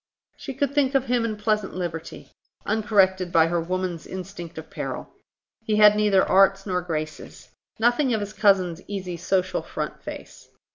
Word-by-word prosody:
She 270 Hz, -, -8 dB
could 280 Hz, 0 st, -1 dB
think 280 Hz, -2 st, +2 dB
of 270 Hz, -1 st, +3 dB
him 245 Hz, -2 st, +1 dB
in 215 Hz, -2 st, -3 dB
pleasant 210 Hz, -2 st, -1 dB
liberty, 170 Hz, -3 st, -6 dB, 0.3 s
uncorrected 195 Hz, -4 st, +2 dB
by 165 Hz, -2 st, +5 dB
her 170 Hz, 0 st, 0 dB
woman's 180 Hz, -1 st, -3 dB
instinct 185 Hz, -3 st, -8 dB
of 160 Hz, -, -9 dB
peril. -, -, -6 dB, 0.5 s
He 220 Hz, -1 st, 0 dB
had 210 Hz, 0 st, +7 dB
neither 210 Hz, -2 st, +3 dB
arts 195 Hz, 0 st, +4 dB
nor 180 Hz, -2 st, -1 dB
graces; 155 Hz, -3 st, -6 dB, 0.3 s
nothing 245 Hz, +4 st, +2 dB
of 220 Hz, -, +1 dB
his 205 Hz, 0 st, -5 dB
cousin's 190 Hz, -5 st, +2 dB
easy 190 Hz, -3 st, -4 dB
social 185 Hz, +2 st, 0 dB
front -, -, -5 dB
face. -, -, -10 dB
195 Hz, 160 wpm, -24 LUFS, 180-215 Hz, 0.5 s, had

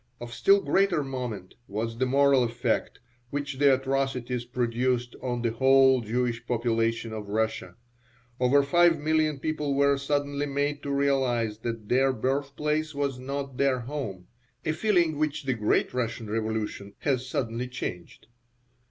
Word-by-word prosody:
Of 120 Hz, -1 st, -8 dB
still 200 Hz, +8 st, +4 dB
greater 190 Hz, -6 st, +2 dB
moment 125 Hz, -8 st, -5 dB
was 115 Hz, +3 st, -4 dB
the 130 Hz, -, +2 dB
moral 140 Hz, 0 st, +4 dB
effect 120 Hz, 0 st, -1 dB, 0.3 s
which 140 Hz, -1 st, -4 dB
the 140 Hz, -2 st, +6 dB
atrocities 130 Hz, -2 st, -2 dB
produced 120 Hz, 0 st, -1 dB
on 120 Hz, -2 st, -2 dB
the 115 Hz, -, +1 dB
whole 130 Hz, +1 st, +5 dB
Jewish 120 Hz, +1 st, -1 dB
population 115 Hz, -1 st, 0 dB
of 105 Hz, -2 st, -6 dB
Russia. 110 Hz, -4 st, -2 dB, 0.6 s
Over 130 Hz, +3 st, +4 dB
five 170 Hz, +3 st, +4 dB
million 155 Hz, 0 st, +1 dB
people 150 Hz, -1 st, -2 dB
were 140 Hz, 0 st, +3 dB
suddenly 145 Hz, 0 st, -1 dB
made 145 Hz, +1 st, -1 dB
to 140 Hz, -, -6 dB
realize 130 Hz, -6 st, +1 dB
that 115 Hz, -2 st, -5 dB
their 135 Hz, +3 st, +3 dB
birthplace 145 Hz, +5 st, -1 dB
was 140 Hz, -3 st, -2 dB
not 135 Hz, 0 st, -5 dB
their 135 Hz, -2 st, +2 dB
home 120 Hz, -9 st, -5 dB, 0.4 s
(a 155 Hz, -, +1 dB
feeling 170 Hz, -3 st, +1 dB
which 155 Hz, -1 st, -1 dB
the 135 Hz, -1 st, 0 dB
great 105 Hz, -3 st, +1 dB
Russian 120 Hz, -2 st, -3 dB
revolution 110 Hz, -2 st, -3 dB
has 130 Hz, -2 st, -1 dB
suddenly 120 Hz, -1 st, -2 dB
changed). 100 Hz, -6 st, -6 dB
130 Hz, 145 wpm, -27 LUFS, 115-140 Hz, 0.6 s, the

